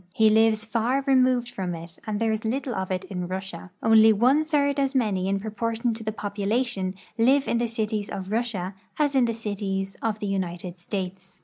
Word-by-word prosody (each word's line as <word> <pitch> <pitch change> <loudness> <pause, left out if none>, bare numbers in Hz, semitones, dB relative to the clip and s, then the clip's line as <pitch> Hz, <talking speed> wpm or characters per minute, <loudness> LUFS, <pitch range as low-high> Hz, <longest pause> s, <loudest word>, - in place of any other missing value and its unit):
He 220 -1 +5
lives 220 0 +4
far 235 +5 0
removed 255 -3 +3
from 180 -5 -3
it, 165 0 -10
and 210 -1 -1
there 225 -1 +1
is 220 0 -2
little 250 +3 -2
of 190 -3 -3
it 185 0 -2
in 180 -2 -5
Russia. 185 -1 -6
Only 220 0 +7
one 250 +8 +4
third 285 -2 +1
as 275 0 0
many 200 -7 +1
in 195 0 +1
proportion 225 +3 -2
to 220 -1 -4
population 205 -1 -1 0.2
live 270 +4 +4
in 235 - +1
the 240 - +1
cities 215 -2 -2
of 190 +1 -5
Russia 215 -5 -1 0.2
as 295 -2 +2
in 260 -3 +4
the 230 -1 -1
cities 195 -3 -3
of 220 -2 -1
the 210 - -5
United 180 -2 -3
States. 190 0 -6
220 Hz, 195 wpm, -25 LUFS, 195-240 Hz, 0.2 s, Only